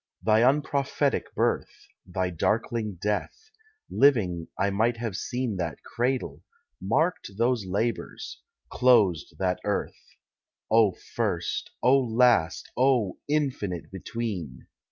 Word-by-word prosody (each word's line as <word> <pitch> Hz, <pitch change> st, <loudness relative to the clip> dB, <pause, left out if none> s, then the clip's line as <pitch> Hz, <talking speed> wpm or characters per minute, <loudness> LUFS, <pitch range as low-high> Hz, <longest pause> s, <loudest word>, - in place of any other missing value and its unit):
Thy 110 Hz, 0 st, +4 dB
unprophetic 140 Hz, +1 st, +1 dB
birth, -, -, -1 dB, 0.2 s
Thy 90 Hz, 0 st, -2 dB
darkling 110 Hz, +3 st, -1 dB
death: 265 Hz, -, -3 dB, 0.4 s
living 95 Hz, -, +2 dB
I 100 Hz, +1 st, +1 dB
might 115 Hz, +4 st, +1 dB
have 115 Hz, -4 st, -4 dB
seen 120 Hz, -4 st, -2 dB
That 85 Hz, -4 st, -4 dB
cradle, 125 Hz, +2 st, -2 dB, 0.4 s
marked 115 Hz, -, 0 dB
those 115 Hz, -3 st, +1 dB
labours, 110 Hz, +5 st, -3 dB, 0.3 s
closed 105 Hz, -11 st, +3 dB
that 90 Hz, -1 st, 0 dB
earth. 105 Hz, -1 st, -4 dB, 0.6 s
O 110 Hz, -4 st, +5 dB, 0.2 s
first, -, -, -1 dB
O 135 Hz, +2 st, +6 dB
last, 115 Hz, -8 st, +2 dB
O 125 Hz, -7 st, +2 dB
infinite 135 Hz, -, -2 dB
between! 95 Hz, -, -5 dB
110 Hz, 105 wpm, -27 LUFS, 95-125 Hz, 0.6 s, O